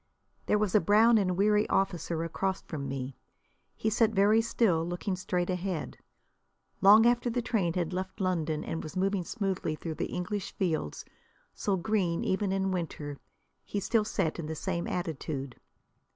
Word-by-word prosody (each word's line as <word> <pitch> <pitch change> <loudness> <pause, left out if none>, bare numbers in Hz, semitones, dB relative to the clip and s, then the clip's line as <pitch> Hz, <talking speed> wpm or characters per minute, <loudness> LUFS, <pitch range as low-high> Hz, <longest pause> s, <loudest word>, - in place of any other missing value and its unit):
There 210 - +3
was 210 -3 0
a 215 - +6
brown 220 +2 +5
and 185 -3 0
weary 210 +1 +3
officer 175 -3 0
across 190 +3 -2
from 140 -4 -5
me. 135 -1 -4 0.6
He 220 - -1
sat 225 0 +4
very 210 +3 +5
still, 215 -7 +2
looking 175 +3 -2
straight 180 0 -1
ahead. 180 -3 -3 0.8
Long 210 +4 +8
after 240 0 +3
the 240 +1 -1
train 195 -8 0
had 175 -1 -1
left 185 +1 -4
London, 165 -5 0
and 165 - -4
was 155 +4 -7
moving 195 0 +1
smoothly 190 -6 -2
through 160 +1 -5
the - - -2
English 195 +2 -3
fields, 160 - -2 0.5
so 200 -2 0
green 180 -3 0
even 190 +1 0
in 195 0 0
winter, 155 -5 -4 0.4
he 205 - -3
still 220 +2 +2
sat 185 -6 -1
in 160 - -4
the 160 - -4
same 170 +1 -2
attitude. 150 -6 -4
185 Hz, 165 wpm, -30 LUFS, 165-210 Hz, 0.8 s, Long